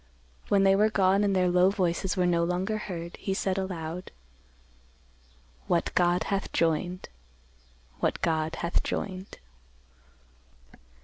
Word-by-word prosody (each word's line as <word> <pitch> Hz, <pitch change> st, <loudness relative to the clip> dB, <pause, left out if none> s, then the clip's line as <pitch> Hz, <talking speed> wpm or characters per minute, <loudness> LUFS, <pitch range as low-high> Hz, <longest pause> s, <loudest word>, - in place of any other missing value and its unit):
When 200 Hz, -1 st, +3 dB
they 195 Hz, 0 st, +5 dB
were 210 Hz, +2 st, +4 dB
gone 195 Hz, -1 st, +3 dB
and 200 Hz, -1 st, +1 dB
their 185 Hz, -1 st, +3 dB
low 180 Hz, +1 st, +5 dB
voices 185 Hz, 0 st, -1 dB
were 180 Hz, -, +2 dB
no 170 Hz, -1 st, +2 dB
longer 185 Hz, +5 st, -1 dB
heard, 170 Hz, -4 st, -6 dB
he 195 Hz, -, -3 dB
said 190 Hz, 0 st, -1 dB
aloud, 180 Hz, -2 st, -5 dB, 1.6 s
"What 170 Hz, -1 st, 0 dB
God 175 Hz, 0 st, +2 dB
hath 195 Hz, -1 st, -2 dB
joined; 170 Hz, +3 st, 0 dB, 0.9 s
what -, -, 0 dB
God 160 Hz, -1 st, 0 dB
hath 170 Hz, -, -1 dB
joined." 190 Hz, -1 st, -5 dB
185 Hz, 125 wpm, -28 LUFS, 170-195 Hz, 1.6 s, they